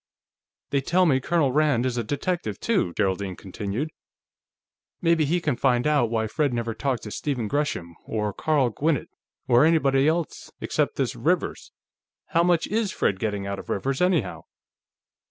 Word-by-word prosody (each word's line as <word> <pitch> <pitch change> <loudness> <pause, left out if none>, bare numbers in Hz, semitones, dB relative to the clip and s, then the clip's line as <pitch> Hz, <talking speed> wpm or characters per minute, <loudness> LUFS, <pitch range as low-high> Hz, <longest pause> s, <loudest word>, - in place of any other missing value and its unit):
"They 140 - +2
tell 180 +6 +3
me 135 -6 +3
Colonel 145 0 +1
Rand 145 -4 +2
is 125 -2 -1
a 120 - -1
detective, 170 - -2
too," 205 - +1
Geraldine 95 -1 -1
continued. 105 - -4 1.1
"Maybe 165 -2 +3
he 170 +5 +1
can 150 -6 0
find 125 -1 +2
out 145 -6 +3
why 110 -1 0
Fred 140 +3 0
never 115 -1 -2
talked 130 +1 -2
to 105 - -7
Stephen 125 -5 -2
Gresham, 105 - -2
or 105 -2 -2
Carl 140 -3 +1
Gwinnett, 150 +4 0 0.4
or 120 +2 +5
anybody 140 -4 +3
else 165 0 -1
except - - -1
this - - -1
Rivers. - - -1 0.6
How 165 - +3
much 175 -1 +3
is 215 -1 -1
Fred 95 - 0
getting 105 -2 -2
out 100 0 -3
of - - -11
Rivers, 135 - -1
anyhow?" 180 -3 +1
135 Hz, 160 wpm, -25 LUFS, 110-160 Hz, 1.1 s, or